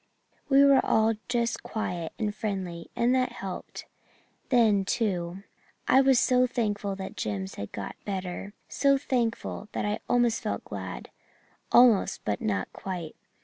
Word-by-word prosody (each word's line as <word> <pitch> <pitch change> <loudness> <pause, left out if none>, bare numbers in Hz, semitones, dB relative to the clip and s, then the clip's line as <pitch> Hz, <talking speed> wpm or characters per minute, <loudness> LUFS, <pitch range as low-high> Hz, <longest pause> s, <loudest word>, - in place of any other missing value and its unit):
We 275 0 +7
were 275 -1 +6
all 220 +1 +3 0.2
just 235 -1 0
quiet 175 -7 -4
and 210 -2 -1
friendly, 190 -6 -4
and 240 +2 +2
that 255 -1 +1
helped. 195 -6 -7 0.6
Then, 220 -6 +4
too, 190 -4 -2 0.4
I 265 - +6
was 265 -2 +5
so 250 0 +3
thankful 205 -5 -2
that 190 0 -7
Jims 95 -2 -3
had 100 - -7
got 100 - -6
better 195 0 -5
so 275 -1 +3
thankful 235 -5 -2
that - - -2
I 210 0 -1
almost 240 -2 +2
felt - - -3
glad - - -7 0.6
almost 240 -5 +5
but 105 -1 -1
not 100 -3 -2
quite. 175 -5 -6
210 Hz, 145 wpm, -27 LUFS, 185-245 Hz, 0.6 s, We